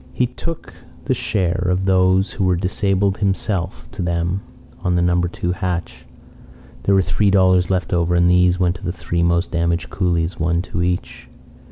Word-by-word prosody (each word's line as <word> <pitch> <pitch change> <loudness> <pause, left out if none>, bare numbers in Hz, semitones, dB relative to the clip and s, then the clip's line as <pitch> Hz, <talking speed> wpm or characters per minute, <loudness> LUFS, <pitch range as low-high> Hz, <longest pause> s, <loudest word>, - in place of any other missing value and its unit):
He 125 - +1
took 165 +6 -7 0.3
the - - +1
share 95 -2 -1
of 90 +1 0
those 95 0 +3
who 100 - -3
were 90 -1 +3
disabled 95 +2 0
himself 95 -2 -1
to 105 - -6
them 85 +2 -1 0.4
on 90 0 0
the 85 - +2
No. 90 0 +2
2 90 0 -2
hatch. 90 -1 -4 0.7
There 100 - +2
were 95 - +4
three 105 +3 +1
dollars 95 -2 +3
left 95 -2 -1
over, 85 0 +1
and 85 0 +4
these 90 0 +3
went 90 -1 +1
to 100 - -17
the 90 - -2
three 85 -1 -3
most 85 +1 +1
damaged 85 0 -1
coolies, 85 -2 -1
one 85 +1 0
to 85 - -4
each. 90 -8 -3
90 Hz, 180 wpm, -20 LUFS, 85-95 Hz, 0.7 s, were